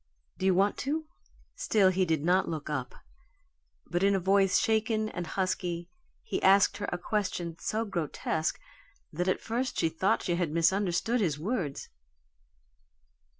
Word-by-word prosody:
Do 190 - +1
you 190 - +4
want 200 +2 +2
to?" 310 +4 -2 0.5
Still 200 -4 +3
he 185 0 +1
did 160 -3 0
not 185 +2 +3
look 155 -2 -4
up, 130 -4 -3 0.9
but 175 - -2
in 200 0 +4
a - - +2
voice, 195 0 +3
shaken 220 0 +1
and 175 -4 -5
husky 175 -1 -2 0.3
he 450 - -3
asked 195 +1 +5
her 205 - -3
a 175 - -1
question 180 -3 -2
so 220 +1 -1
grotesque 160 -3 -2 0.5
that 175 +4 -1
at 185 - +1
first 245 +3 -3
she 165 - +2
thought 190 +7 0
she 175 -1 0
had 175 -3 0
misunderstood 190 +7 +1
his 160 -8 0
words. 170 - -3
185 Hz, 150 wpm, -29 LUFS, 170-205 Hz, 0.9 s, asked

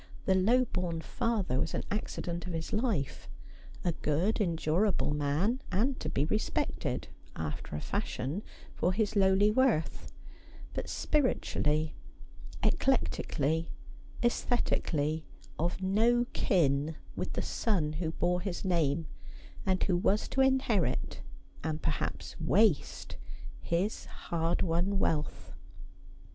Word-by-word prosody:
The 190 - +4
low 230 +7 +4
born 175 -6 -2
father 200 - 0
was 160 - -1
an - - -1
accident 175 -4 -3
in 180 - -4
his 165 -1 -4
life 215 - -1 0.3
— 70 0 -17
a 175 - +3
good 165 +7 0
endur 170 +1 +2
able 185 -6 +1
man, 150 - +1
and 250 +7 +1
to - - -3
be 145 - +1
respected 215 +7 -1 0.3
(after 75 -1 -4
a 75 - -3
fashion) 145 +10 -2 0.3
for 180 - +1
his 215 +1 0
lowly 195 +1 +5
worth, 230 -9 +1 0.6
but - - -4
spiritually, 160 - +1 0.7
eclectically, 160 +4 +1 0.6
sesthetically, 160 -10 +1 0.3
of 175 +3 -1
no 230 +5 +3
kin 150 -3 +2 0.2
with - - -3
the - - -1
son 170 -10 0
who 160 0 -2
bore 180 +1 +1
his 190 0 -4
name, 165 -3 +2 0.6
and 185 -1 +2
who 185 - +2
was 195 +4 +2
to 270 - +2
inherit, 250 - +1 0.4
and 155 0 -2
perhaps 155 - -2
waste, 190 0 +2 0.4
his 180 +6 -1
hard 165 0 -1
won 180 +3 +1
wealth. 150 -5 -1
175 Hz, 120 wpm, -31 LUFS, 155-210 Hz, 0.7 s, lowly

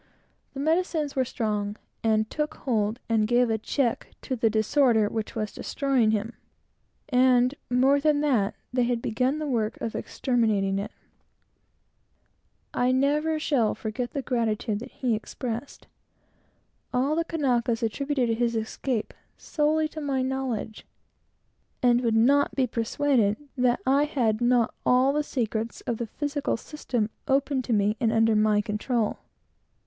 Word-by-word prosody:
The - - -5
medicines 315 -1 0
were 260 - +2
strong, 210 -4 -2 0.3
and 220 -1 +2
took 300 +4 -3
hold 220 -2 -1
and 220 -2 +2
gave 240 0 +3
a 220 - 0
check 240 +2 -1 0.2
to 260 - -2
the 225 -2 +2
disorder 220 0 +3
which 220 +2 -4
was 215 -2 -2
destroying 270 -6 0
him; 220 +2 -1 0.8
and, 250 0 +4 0.2
more 260 +3 +4
than 295 0 +2
that, 245 -10 +1 0.2
they 250 - +2
had 240 -1 +1
begun 255 +5 0
the 310 - -3
work 225 -6 -1
of 225 - -3
exterminating 215 -6 0
it. 200 - -5 1.8
I 245 - +1
shall 255 - +3
never 295 -3 +1
forget 235 +3 -4
the 280 - -3
gratitude 225 -3 -1
that 240 - -8
he 250 -3 -1
expressed. 235 +3 -5 1.1
All 270 +4 +1
the 335 - +1
Kanakas 245 -8 0
attributed 260 +2 0
his 235 -1 +1
escape 225 +1 -2 0.2
solely 310 +1 +1
to 310 - -7
my 275 -3 0
knowledge, 260 -5 -3 1.0
and 245 0 +4
would 230 -2 +1
not 275 +6 +3
be 265 - +2
persuaded 230 -2 +1 0.2
that 250 -2 +2
I 275 +3 +4
had 240 -8 0
not 240 -1 +3
all 255 +2 +4
the 300 - +1
secrets 230 -5 -3
of 235 - -3
the 235 - -4
physical 290 +3 -2
system 240 -5 -3 0.2
open 275 0 +1
to 250 - -5
me 210 0 +2
and 225 -2 +2
under 225 -1 +3
my 210 -1 +3
control. 215 +2 -1
245 Hz, 145 wpm, -26 LUFS, 220-275 Hz, 1.8 s, and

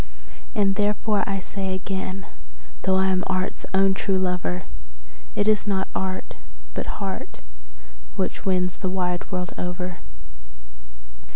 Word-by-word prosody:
And 200 -2 +4
therefore 210 +1 +2
I 195 -1 0
say 190 0 -2
again, 190 0 -3 0.6
though 190 0 +3
I 190 0 +4
am 185 -1 +3
art's 185 0 0
own 195 0 +5
true 190 0 +1
lover, 180 -1 +1 0.7
That - - +2
it 205 - +2
is 215 -1 +4
not 190 -2 +1
art, 190 0 -2 0.4
but - - -2
heart, 195 -2 -4 0.8
which 190 -2 -1
wins 180 -1 +2
the 190 - -1
wide 180 -1 0
world 180 -1 -1
over. 180 0 -2
190 Hz, 130 wpm, -26 LUFS, 185-195 Hz, 0.8 s, own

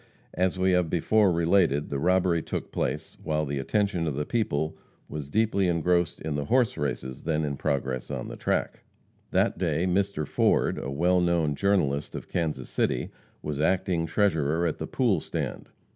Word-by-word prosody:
As 95 +1 0
we 95 0 +2
have 90 -2 +2
before 100 +4 +3
related, 85 -4 +2
the 70 - -1
robbery 90 0 +2
took - - -5
place - - -3
while 75 0 -1
the 70 -1 -3
attention 95 +2 0
of 75 - -2
the 75 +1 -2
people 80 -9 -1 0.3
was 75 -2 -6
deeply 105 -1 +2
engrossed 85 0 +1
in 80 -1 -3
the 70 0 -2
horse 125 -1 +2
races 65 -3 -3
then 80 -1 0
in 70 -1 -2
progress 65 -2 -2
on - - -4
the - - -7
track. - - -2 0.5
That - - +1
day 85 - +1
Mr. 95 -4 0
Ford, - - +2
a 65 - -4
well 90 +6 +2
known 85 -4 +2
journalist 75 -5 0
of - - -7
Kansas 80 -3 -2
City, - - -1 0.3
was 75 -1 -3
acting 90 -1 +1
treasurer 80 -3 +1
at 80 - -1
"the - - -4
pool 115 -9 +1
stand." - - -5
85 Hz, 175 wpm, -27 LUFS, 75-95 Hz, 0.5 s, before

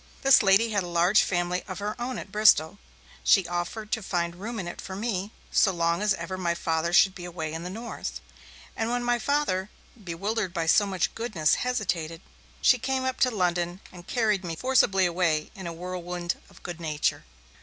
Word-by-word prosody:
This 270 -1 +7
lady 205 +3 +4
had 205 -2 +1
a 175 - -5
large 175 +4 +4
family 175 0 0
of 185 - -6
her 205 +1 -3
own 250 +1 -3
at 195 - -8
Bristol; 205 -4 +4 0.4
she 65 +2 +4
offered 175 +5 -4
to 225 - 0
find 170 -3 -2
room 225 +5 -5
in 185 -4 -4
it 175 - -7
for 190 - -7
me 205 -1 -2 0.2
so 195 - +4
long 170 0 0
as 210 -1 +2
ever 185 +2 -5
my 170 -2 0
Father 165 0 -1
should 190 +2 +5
be 180 - -9
away 165 -3 -5
in 160 - -4
the 180 - -5
north; 200 - -6 0.6
and 225 0 -1
when 245 0 -1
my 240 0 +1
Father, 220 -9 0 0.3
bewildered 190 +2 -2
by 165 - 0
so 205 +5 +4
much 185 -3 -1
goodness, 200 -10 +1
hesitated, 180 -10 -2 0.4
she 250 - +5
came 260 +1 -1
up 260 -1 -2
to 255 - +4
London 180 -4 -1
and 175 -1 -13
carried 215 -5 +1
me 170 -2 -4
forcibly 195 -4 +3
away 170 -3 0
in 190 -3 -7
a - - -4
whirlwind 175 0 -4
of - - -18
good 175 -1 -6
nature. 155 -2 -1
185 Hz, 195 wpm, -27 LUFS, 170-215 Hz, 0.6 s, This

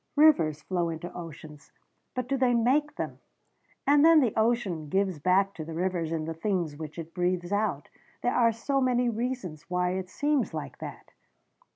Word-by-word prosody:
Rivers 165 - +4
flow 175 -2 -1
into 165 +2 -6
oceans 155 -3 -10 0.4
but 255 -1 -2
do 275 - 0
they 255 -2 +3
make 270 +6 +2
them? - - -5 0.7
And 285 +1 +5
then 325 0 +8
the 245 -7 +2
ocean 215 -9 0
gives 190 -2 0
back 190 +5 +3
to 160 - -6
the 160 +1 -7
rivers 175 -2 -1
in 160 -1 -2
the 165 - -3
things 170 -3 -1
which 155 +1 -8
it 165 0 -7
breathes 180 0 -1
out. 205 -9 0 0.4
There 245 - +2
are 230 -2 +4
so 270 +5 -1
many 250 -1 +2
reasons 230 - -4
why 180 0 +1
it 185 0 -3
seems 290 +4 0
like - - -6
that." - - -9
190 Hz, 180 wpm, -28 LUFS, 165-245 Hz, 0.7 s, then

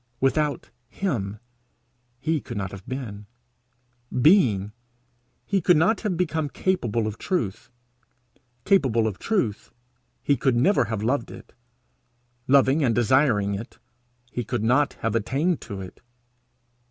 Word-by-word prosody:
Without 145 +2 0 0.2
him 110 - -3 0.8
he 155 +2 -1
could 120 -4 -7
not 95 -2 -3
have 100 -1 -11
been; 110 -6 -6 0.9
being, 120 - +4 0.7
he 195 -2 0
could 175 -1 +4
not 200 +8 +2
have 200 -6 -1
become 160 -4 -1
capable 120 - -1
of 110 0 -5
truth; 120 - -2 1.0
capable 130 - +3
of 105 -3 -3
truth, 160 - -1 0.5
he 140 - +3
could 135 -3 +1
never 130 - +3
have 110 -1 -3
loved 120 +1 0
it; - - -12 0.9
loving 140 +2 +4
and 115 -4 +2
desiring 120 -4 +3
it, 110 +5 -7 0.5
he 120 - -3
could 105 - -3
not 130 +5 +2
have 115 -1 0
attained 140 - 0
to 100 -1 -7
it. 95 - -11
130 Hz, 130 wpm, -24 LUFS, 110-155 Hz, 1.0 s, being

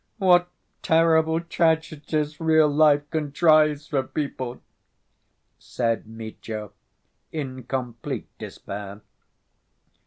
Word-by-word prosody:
"What 180 -3 +4 0.3
terrible 160 0 +3
tragedies 155 -3 -1
real 160 -1 +4
life 145 0 +3
contrives 155 -1 +3
for 145 -3 0
people," 130 -3 -4 1.0
said 115 -3 -2
Mitya, 110 -1 -7 0.6
in 130 -5 -5
complete 125 -3 -4
despair. 100 0 -8
150 Hz, 80 wpm, -24 LUFS, 125-160 Hz, 1.0 s, What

